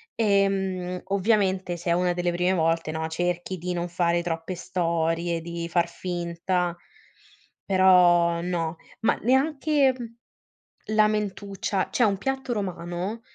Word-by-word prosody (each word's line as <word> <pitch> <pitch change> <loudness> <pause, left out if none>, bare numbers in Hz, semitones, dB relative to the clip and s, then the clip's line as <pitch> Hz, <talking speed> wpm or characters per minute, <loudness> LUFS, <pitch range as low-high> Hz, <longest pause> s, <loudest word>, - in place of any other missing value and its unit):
ehm, 195 -4 +1
ovviamente 195 -3 +1
se 170 0 -2
è - - +5
una 180 +1 +2
delle 175 0 -1
prime 180 +1 +1
volte, 165 -2 +1
no, 160 0 -3
cerchi 175 +3 -2
di 180 +1 -4
non 175 0 -2
fare 175 0 +1
troppe 165 +1 -4
storie, 170 -1 -1
di 170 0 -5
far 170 0 +2
finta, 175 0 -2 0.9
però 175 -3 +5
no. 170 -2 -2 0.3
Ma 225 - +3
neanche 275 +2 +3 0.9
la 215 0 +4
mentuccia, 200 -2 -2
c'è - - 0
un 200 -3 +2
piatto 270 +2 -2
romano, 185 +1 -3
180 Hz, 125 wpm, -25 LUFS, 170-200 Hz, 0.9 s, è